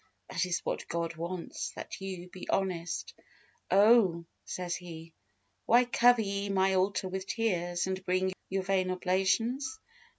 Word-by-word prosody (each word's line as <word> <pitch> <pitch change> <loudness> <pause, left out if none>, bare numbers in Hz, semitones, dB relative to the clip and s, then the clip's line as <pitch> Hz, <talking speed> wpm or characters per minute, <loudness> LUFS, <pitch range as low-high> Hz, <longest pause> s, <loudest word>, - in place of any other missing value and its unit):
That 180 - 0
is 175 - -1
what - - -2
God 170 0 -2
wants 170 +2 -4
that - - -7
you 185 -2 -5
be 180 0 -10
honest. 180 -3 -1 0.6
"Oh," 195 -4 +5 0.2
says 180 -1 -3
He, 165 -2 -9 0.5
"why 245 +2 +6
cover 245 -1 +5
ye 200 0 -2
my 190 0 +3
altar 190 0 +1
with 190 +1 -4
tears, 175 -6 0
and 190 0 -3
bring 185 +1 +1 0.2
your 190 0 -1
vain 185 -1 +1
oblations? 195 +9 0
185 Hz, 140 wpm, -31 LUFS, 180-200 Hz, 0.6 s, why